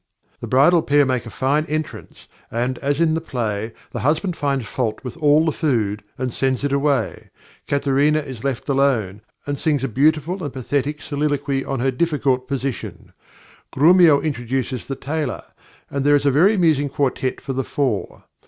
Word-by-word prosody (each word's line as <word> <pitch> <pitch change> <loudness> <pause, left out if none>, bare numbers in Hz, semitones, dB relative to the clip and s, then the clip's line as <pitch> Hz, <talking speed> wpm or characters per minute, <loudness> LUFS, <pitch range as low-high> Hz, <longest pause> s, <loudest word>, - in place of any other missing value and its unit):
The - - -6
bridal 150 +7 +5
pair 145 -1 +3
make 125 -3 -1
a - - -6
fine 140 +6 0
entrance, 155 -1 -5 0.2
and, 125 +2 -2
as 145 +1 -1
in 165 -2 +3
the 160 - -1
play, 110 -7 -3 0.2
the - - -4
husband 160 +6 0
finds 140 -5 -1
fault 115 -1 -3
with 125 - -6
all 150 0 +4
the 160 - +2
food, 110 -10 -1 0.2
and 125 -2 -3
sends 130 0 0
it 145 -1 0
away. 140 -1 0 0.4
Katharina 140 +2 +2
is 135 -7 -5
left 135 -3 -2
alone, 130 -8 +1 0.2
and 145 -1 -3
sings 145 -4 0
a - - +1
beautiful 155 - +1
and 145 - -3
pathetic 140 +3 -2
soliloquy 145 -2 -1
on 135 -2 -3
her 135 +1 +2
difficult 135 -3 0
position. 135 -3 -5 0.6
Grumio 165 0 +6
introduces 130 -3 -3
the 135 - -3
Tailor, 150 +3 -3 0.4
and 140 -1 -3
there 145 +1 +5
is 145 0 +1
a 140 - +4
very 180 +11 +4
amusing 155 -6 +2
quartet 135 -2 -1
for 135 - -5
the 135 +1 -1
four. 130 -6 -2
140 Hz, 170 wpm, -21 LUFS, 130-150 Hz, 0.6 s, Grumio